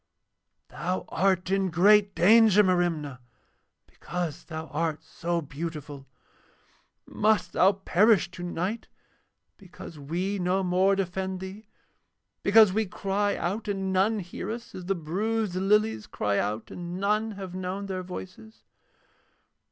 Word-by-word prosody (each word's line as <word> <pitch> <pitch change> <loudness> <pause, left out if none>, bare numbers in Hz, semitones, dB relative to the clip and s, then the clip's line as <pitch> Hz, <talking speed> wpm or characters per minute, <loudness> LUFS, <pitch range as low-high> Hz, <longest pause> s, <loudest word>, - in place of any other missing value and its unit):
'Thou 185 +1 -3
art 185 +1 +1
in 195 -1 +1
great 200 +4 +4
danger, 210 +1 +6
Merimna, 170 -8 0 0.7
because 175 -4 -5
thou 160 -1 -6
art 160 0 -2
so 170 0 -3
beautiful. 145 -2 -7 1.0
Must 215 0 +1
thou 190 +2 +5
perish 195 0 +3
tonight 180 +5 -4 0.7
because 175 -4 -12
we 180 +8 -2
no 185 +2 +1
more 185 +2 +3
defend 190 0 -3
thee, 195 +3 -9 0.7
because 210 -1 +6
we 220 0 0
cry 200 +2 -1
out 205 +5 -3
and 195 -2 -2
none 200 +4 +2
hear 175 0 -7
us, 230 +1 -6
as 180 - -8
the 195 +2 0
bruised 200 +5 -2
lilies 200 - +1
cry 100 -1 -1
out 105 +2 -3
and 175 +1 -6
none 210 +2 0
have 190 -3 -8
known 185 +2 -4
their 190 -1 -4
voices?' 185 +4 -10
185 Hz, 125 wpm, -27 LUFS, 175-205 Hz, 1.0 s, danger